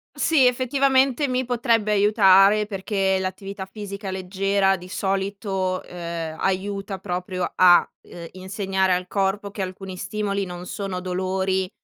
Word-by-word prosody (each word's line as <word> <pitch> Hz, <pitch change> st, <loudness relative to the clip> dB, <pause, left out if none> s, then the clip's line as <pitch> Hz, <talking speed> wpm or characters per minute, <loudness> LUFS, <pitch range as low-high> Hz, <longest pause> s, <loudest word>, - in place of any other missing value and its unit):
Sì, 290 Hz, -6 st, +4 dB
effettivamente 265 Hz, +2 st, +2 dB
mi 255 Hz, 0 st, -1 dB
potrebbe 230 Hz, -3 st, +1 dB
aiutare, 205 Hz, 0 st, +5 dB
perché 195 Hz, -1 st, -1 dB
l'attività 190 Hz, +1 st, -5 dB
fisica 200 Hz, 0 st, -7 dB
leggera 195 Hz, +1 st, +1 dB
di 180 Hz, 0 st, -11 dB
solito, 195 Hz, -1 st, -2 dB
ehm, 170 Hz, -2 st, -6 dB
aiuta 195 Hz, +1 st, -2 dB
proprio 180 Hz, -1 st, -3 dB
a, 180 Hz, -1 st, +6 dB
uhm, 170 Hz, -1 st, -10 dB
insegnare 190 Hz, 0 st, -1 dB
al 180 Hz, 0 st, -4 dB
corpo 200 Hz, +1 st, -1 dB
che 200 Hz, -, -6 dB
alcuni 185 Hz, 0 st, -6 dB
stimoli 200 Hz, -1 st, -2 dB
non 180 Hz, 0 st, -8 dB
sono 195 Hz, -1 st, -4 dB
dolori 185 Hz, +1 st, -1 dB
195 Hz, 125 wpm, -23 LUFS, 185-205 Hz, -, a